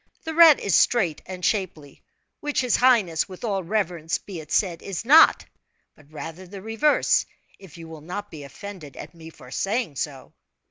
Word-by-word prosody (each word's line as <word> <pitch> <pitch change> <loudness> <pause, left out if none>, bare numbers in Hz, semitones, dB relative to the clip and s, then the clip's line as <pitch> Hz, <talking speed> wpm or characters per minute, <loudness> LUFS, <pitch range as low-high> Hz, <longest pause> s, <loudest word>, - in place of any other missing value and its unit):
The 320 - -5
rat 325 -2 +7
is 200 - -2
straight 185 -9 +2
and 180 -1 -6
shapely 165 -9 -3 0.4
which 295 -2 -1
his 250 -3 +1
highness, 210 -11 +2
with 185 +3 -11
all 200 -5 -2
reverence 175 -4 -2
be 190 -5 -9
it 155 -2 -12
said 175 -5 0
is 195 +2 -6
not, 310 +6 +6 0.5
but 150 -1 -22
rather 165 +4 -9
the 195 +1 -10
reverse, 225 +7 +2 0.4
if 185 -5 -14
you 165 -1 -10
will 160 -2 -11
not 205 +6 -7
be 155 - -9
offended 160 0 -10
at - - -10
me 165 -1 -12
for 125 -5 -15
saying 200 - -2
so." 135 -3 -6
185 Hz, 180 wpm, -24 LUFS, 160-220 Hz, 0.5 s, rat